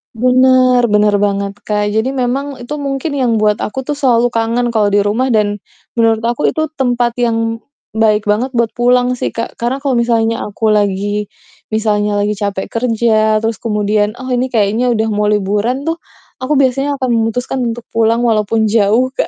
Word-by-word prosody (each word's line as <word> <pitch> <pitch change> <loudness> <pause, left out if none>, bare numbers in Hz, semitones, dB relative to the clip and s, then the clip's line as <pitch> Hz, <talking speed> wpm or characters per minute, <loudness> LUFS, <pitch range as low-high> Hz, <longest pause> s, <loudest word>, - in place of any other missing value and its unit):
Benar, 255 0 +4
benar 210 -1 +2
banget 200 0 -1
Kak. 210 -1 0
Jadi 220 +6 -1
memang 270 +3 -2
itu 295 +5 -5
mungkin 275 +2 -3
yang 255 -5 0
buat 210 -1 +1
aku 265 +5 -4
tuh 290 +2 -4
selalu 245 -3 +2
kangen 235 +1 0
kalau 215 -3 +2
di 205 0 +2
rumah 220 +6 0
dan, 210 -4 +1 0.4
menurut 225 -1 +2
aku 240 +5 0
itu 315 -1 -1
tempat 245 -2 +1
yang 230 -1 0 0.3
baik 215 -1 +2
banget 230 +6 -1
buat 235 -1 +1
pulang 245 +1 +2
sih - - -3
Kak. 230 - -5
Karena 255 +4 -2
kalau 280 - 0
misalnya 230 -1 +1
aku 215 +1 -1
lagi 205 0 0 0.4
misalnya 210 -1 0
lagi 205 +1 0
capek 200 -2 -3
kerja, 220 -2 +1
terus 225 -2 -2
kemudian, 210 -1 0
oh 255 +1 -7
ini 250 +1 +1
kayaknya 225 0 +1
udah 220 0 0
mau 210 0 0
liburan 210 +5 0
tuh, 325 +2 -2 0.4
aku 260 +4 -1
biasanya 275 +1 +1
akan 260 -2 -2
memutuskan 235 +3 -1 0.2
untuk 240 - -10
pulang, 230 +1 +1
walaupun 220 -1 +1
jauh, 225 +4 +2
Kak. - - -2
230 Hz, 175 wpm, -15 LUFS, 210-250 Hz, 0.4 s, Benar